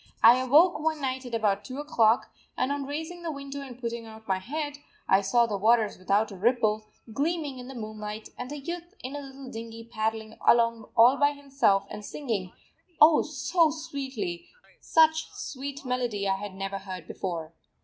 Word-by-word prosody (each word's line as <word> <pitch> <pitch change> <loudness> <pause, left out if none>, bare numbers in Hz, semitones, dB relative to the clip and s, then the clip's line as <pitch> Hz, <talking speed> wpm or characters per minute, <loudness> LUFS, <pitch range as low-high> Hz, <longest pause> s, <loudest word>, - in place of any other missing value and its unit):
I 235 +3 +9
awoke 295 +7 +5
one 315 0 0
night 260 -2 -3
at 235 - -3
about 205 -3 +1
2 255 - -7
o'clock, 240 -6 +2 0.3
and, 260 - +1
on 285 -1 -2
raising 320 +4 -5
the 335 -2 -3
window 280 -1 -6
and 255 -3 -9
putting 235 -2 -4
out 220 0 -13
my 190 -1 +1
head, 290 +7 -4 0.3
I 190 - +5
saw 235 +5 +3
the 210 -3 -3
waters 220 -1 +3
without 200 +4 +1
a - - -7
ripple, 215 0 +1 0.3
gleaming 295 0 -1
in 250 - -8
the 265 - -8
moonlight, 215 -1 -6
and 250 +2 -6
a 295 - -4
youth 345 +6 -6
in 260 +3 -5
a 290 - -4
little 270 -1 -10
dinghy 225 0 -7
paddling 220 -1 -3
along 230 -1 +3
all 245 +4 +7
by 290 0 +3
himself 275 -8 +1
and 210 - -7
singing, 210 -8 -3 0.5
oh 305 +1 +8
so 315 +3 +2
sweetly, 275 - -5 0.3
such 315 0 +3
sweet 280 -8 -6
melody 245 -6 -1
I 195 0 +1
had 200 -1 -7
never 195 0 -4
heard 185 -4 -7
before. 165 -3 -4
245 Hz, 180 wpm, -28 LUFS, 215-285 Hz, 0.5 s, I